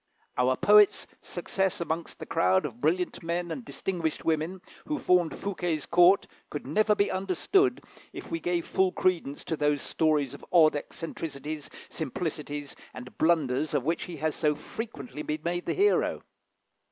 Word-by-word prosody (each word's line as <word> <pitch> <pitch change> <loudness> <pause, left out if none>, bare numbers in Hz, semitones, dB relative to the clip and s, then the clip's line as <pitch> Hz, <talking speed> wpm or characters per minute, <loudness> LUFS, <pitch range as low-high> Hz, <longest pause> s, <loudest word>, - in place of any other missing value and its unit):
Our 130 +1 +2
poet's 210 -1 +5 0.2
success 190 +1 -2
amongst 165 0 -3
the - - -7
crowd 95 +5 +2
of 120 -4 -7
brilliant 175 +4 0
men 170 +1 -2
and 255 - -4
distinguished 175 -8 -3
women 165 +3 0 0.3
who 300 - -1
formed 180 - +2
Fouquet's 175 -6 -2
court, 175 +3 +5 0.2
could 145 - -5
never 210 +9 +3
be 200 - +2
understood, 195 - +1 0.3
if - - -9
we 330 - -1
gave 175 - -1
full 190 -1 +2
credence 170 -6 0
to 160 - -2
those 150 -2 +1
stories 150 -4 +1
of 140 - -11
odd 160 -4 +6
eccentricities, 150 -1 -5 0.2
simplicities, 145 -2 -4 0.2
and 125 0 -9
blunders 155 -3 +2
of 140 - +1
which 165 +4 -1
he 175 -2 -7
has 155 +1 -1
so 150 0 +1
frequently 220 +2 -7
been 150 0 -3
made 175 +1 -2
the - - 0
hero. 410 +2 +2
165 Hz, 155 wpm, -28 LUFS, 150-185 Hz, 0.3 s, odd